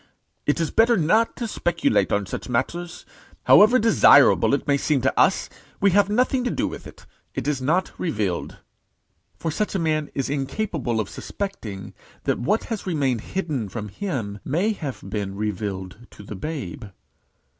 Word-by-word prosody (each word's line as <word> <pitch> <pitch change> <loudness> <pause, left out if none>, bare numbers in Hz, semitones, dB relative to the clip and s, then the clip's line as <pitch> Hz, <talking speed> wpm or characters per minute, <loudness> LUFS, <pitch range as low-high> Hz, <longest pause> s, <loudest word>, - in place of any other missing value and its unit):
It 145 - +2
is 165 - -1
better 230 +1 +4
not 210 +8 +2
to 235 - -4
speculate 215 - +1
on 100 0 +1
such 100 - -6
matters. 170 +8 -3 0.4
However 215 +5 +7
desirable 210 - +6
it - - -5
may 140 - +4
seem 140 0 +1
to 135 - +1
us, 190 - +3 0.3
we 200 0 +4
have 200 +1 +4
nothing 250 +3 +1
to 245 - 0
do - - -1
with - - -8
it. - - -14 0.3
It - - -3
is 145 -3 0
not 165 +8 +1
revealed." 105 - -2 0.8
For 165 - -3
such 210 +6 -2
a - - +3
man 155 -3 0
is 135 - -1
incapable 140 - -2
of 105 - -1
suspecting, 110 - -6 0.3
that - - 0
what 205 - +1
has 220 -4 -5
remained 135 - 0
hidden 150 - -3
from 105 0 -6
him 110 - -4
may 175 +10 0
have 145 -10 -6
been 100 -1 -4
revealed 105 +1 -4
to - - -13
the 105 - -8
babe. 120 - -5
150 Hz, 165 wpm, -23 LUFS, -, 0.8 s, However